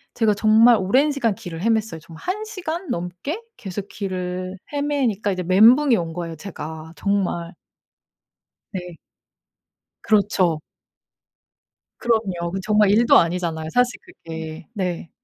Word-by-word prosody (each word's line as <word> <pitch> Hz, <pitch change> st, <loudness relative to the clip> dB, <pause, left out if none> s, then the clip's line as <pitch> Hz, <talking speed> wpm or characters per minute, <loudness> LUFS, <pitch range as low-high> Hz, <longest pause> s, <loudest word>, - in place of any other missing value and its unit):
제가 215 Hz, -3 st, +2 dB
정말 220 Hz, +3 st, +6 dB
오랜 260 Hz, +11 st, +3 dB
시간 240 Hz, -7 st, 0 dB
길을 175 Hz, -7 st, -8 dB
헤맸어요. 220 Hz, -5 st, 0 dB
정말 165 Hz, 0 st, -13 dB
1 420 Hz, +4 st, -2 dB
시간 355 Hz, -4 st, -5 dB
넘게 180 Hz, -, -4 dB, 0.2 s
계속 200 Hz, -1 st, -6 dB
길을 185 Hz, -1 st, -4 dB, 0.2 s
헤매니까 270 Hz, -9 st, 0 dB
이제 185 Hz, -, -2 dB
멘붕이 230 Hz, -, +6 dB
온 165 Hz, -3 st, -3 dB
거예요 170 Hz, -1 st, -5 dB
제가 160 Hz, -2 st, -8 dB
정말. 190 Hz, -3 st, -1 dB, 1.2 s
네. 180 Hz, -3 st, -6 dB, 1.1 s
그렇죠. 195 Hz, -6 st, +2 dB, 1.4 s
그럼요. 190 Hz, -7 st, 0 dB
그 195 Hz, -, -2 dB
정말 210 Hz, -1 st, +3 dB
일도 230 Hz, +3 st, +6 dB
아니잖아요 165 Hz, -2 st, 0 dB
사실 245 Hz, -3 st, +2 dB
그게. 160 Hz, 0 st, -8 dB
네. 180 Hz, -4 st, -3 dB
195 Hz, 250 characters per minute, -22 LUFS, 175-230 Hz, 1.4 s, 정말